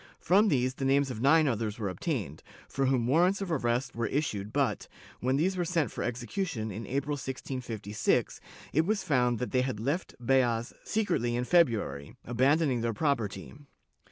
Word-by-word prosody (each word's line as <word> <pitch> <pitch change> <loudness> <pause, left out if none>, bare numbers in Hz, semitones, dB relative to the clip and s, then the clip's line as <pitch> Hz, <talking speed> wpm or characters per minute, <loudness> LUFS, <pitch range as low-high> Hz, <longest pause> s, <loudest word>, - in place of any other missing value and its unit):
From 200 +5 +4
these 130 -7 +1
the 135 - -6
names 135 0 +2
of 115 -3 -6
nine 155 +3 +5
others 110 -4 -1
were 105 -3 -2
obtained, 95 - -3 0.3
for 135 -1 0
whom 130 -3 +2
warrants 175 +9 +3
of 195 -3 -4
arrest 125 -3 0
were 115 -1 -1
issued 110 -9 -2
but, - - 0 0.3
when 130 +2 +1
these 180 +7 +1
were 180 - 0
sent 165 - 0
for - - -4
execution, 120 - -3
in 110 +4 -6
April, 140 +3 -1
1656, 125 -6 -2 0.3
it 160 +4 +2
was 210 -2 0
found 125 -8 +2
that 125 - -4
they 130 - +2
had 130 -5 -2
left 145 +10 -2
Beas 120 -2 +1
secretly 120 - 0
in 120 - 0
February, 115 - +1
abandoning 130 +2 +2
their 115 0 -1
property. 115 - -1
130 Hz, 170 wpm, -29 LUFS, 115-155 Hz, 0.3 s, nine